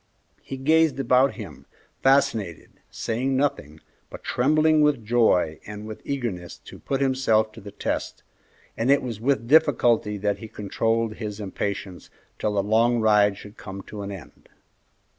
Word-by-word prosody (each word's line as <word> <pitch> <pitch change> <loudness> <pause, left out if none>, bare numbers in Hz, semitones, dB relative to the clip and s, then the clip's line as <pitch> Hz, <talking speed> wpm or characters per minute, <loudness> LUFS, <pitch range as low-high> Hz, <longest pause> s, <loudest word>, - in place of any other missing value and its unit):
He 135 - -7
gazed 155 +2 +3
about 130 +1 +3
him, - - -10 0.3
fascinated, 110 - +1 0.2
saying 130 +4 -2
nothing, 80 - -2 0.3
but - - -10
trembling 155 +4 +3
with 145 -7 +2
joy 105 -9 +2
and 105 0 -7
with 110 0 -8
eagerness 110 - -4
to - - -11
put 135 0 -2
himself 130 -5 +2
to 115 - -12
the 100 - -9
test, 100 - -4 0.5
and 115 +3 -1
it 140 - +4
was 115 -4 -5
with 125 -2 0
difficulty 120 -8 +3
that 100 0 -1
he 110 - -8
controlled 115 +2 -1
his 105 -2 -5
impatience 100 -2 -5 0.3
till 105 - -1
the 100 - +1
long 115 +3 +3
ride 105 -2 +4
should 105 +2 -12
come 95 0 -8
to 105 - -8
an 100 0 -5
end. 90 -9 -12
115 Hz, 155 wpm, -24 LUFS, 105-135 Hz, 0.5 s, it